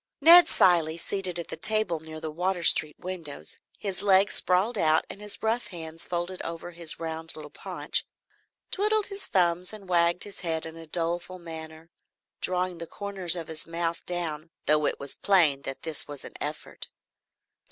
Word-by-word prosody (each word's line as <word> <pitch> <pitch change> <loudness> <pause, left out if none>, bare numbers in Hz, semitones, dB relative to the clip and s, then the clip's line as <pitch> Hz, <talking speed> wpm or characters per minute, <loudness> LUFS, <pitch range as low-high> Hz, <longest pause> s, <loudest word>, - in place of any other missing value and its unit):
Ned 345 +1 +9
Cilley, 165 -3 +4
seated 185 0 -3
at 170 - -5
the - - -4
table 215 -6 0
near 155 0 -9
the 155 -1 -5
Water 180 +2 -1
Street 155 -2 +3
windows, 165 - -6 0.2
his 195 -3 -4
legs 200 0 +4
sprawled 190 +6 +2
out 155 -5 +3
and 200 - -11
his 210 +1 -3
rough 225 +2 0
hands 165 -2 -7
folded 175 +1 -3
over 170 +1 -6
his 170 -2 +2
round 160 0 -4
little 150 -1 -9
paunch, - - -1 0.7
twiddled 425 +1 +3
his 395 0 -3
thumbs 180 0 +2
and 205 -3 -10
wagged 170 0 +3
his 205 - -7
head 160 -3 -2
in 160 0 -8
a 165 -1 -10
doleful 175 +3 -1
manner, 160 -1 -10 0.5
drawing 180 -1 0
the 170 - -5
corners 195 -3 +1
of 165 -3 -5
his 160 0 0
mouth 165 0 -2
down, 165 -3 -3 0.2
though 150 0 +4
it - - -1
was 140 0 -5
plain 165 -9 +3
that 135 - -5
this 160 -3 -2
was 145 -2 -7
an - - -10
effort. 150 +1 -6
170 Hz, 175 wpm, -27 LUFS, 160-190 Hz, 0.7 s, Ned